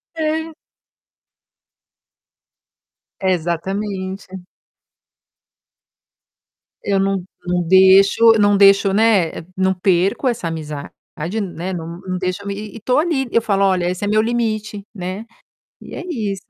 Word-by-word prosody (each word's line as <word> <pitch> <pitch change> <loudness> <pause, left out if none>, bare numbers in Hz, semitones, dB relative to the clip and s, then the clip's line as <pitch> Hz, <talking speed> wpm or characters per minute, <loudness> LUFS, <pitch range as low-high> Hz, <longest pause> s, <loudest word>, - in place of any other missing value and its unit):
É. 320 0 -2 2.7
Exatamente. 190 +2 -3 2.5
Eu 200 -1 +1
não 195 -1 0 0.2
não 180 0 0
deixo 190 +5 +6
eu - - +1
não 205 0 +4
deixo, 195 0 +5
né, 205 -5 +3 0.3
não 190 0 +2
perco 185 +6 +1
essa 235 -8 -1
amizade, 150 -3 -6 0.5
né, 185 -1 -5
não 170 0 -6
não 185 -1 -4
deixo 185 +2 -3
e - - -2
e 210 +2 -6
e - - -9
estou 250 +6 +1
ali, 305 -5 0
eu 230 - +3
falo: 200 -3 +1
"Olha, 185 -2 +1
esse 180 +2 -4
é - - -2
meu 215 +1 +3
limite.", 215 -3 -2
né. 190 +2 -6 0.6
E - - -11
é - - -6
isso. 205 - -3
195 Hz, 125 wpm, -19 LUFS, 185-215 Hz, 2.7 s, deixo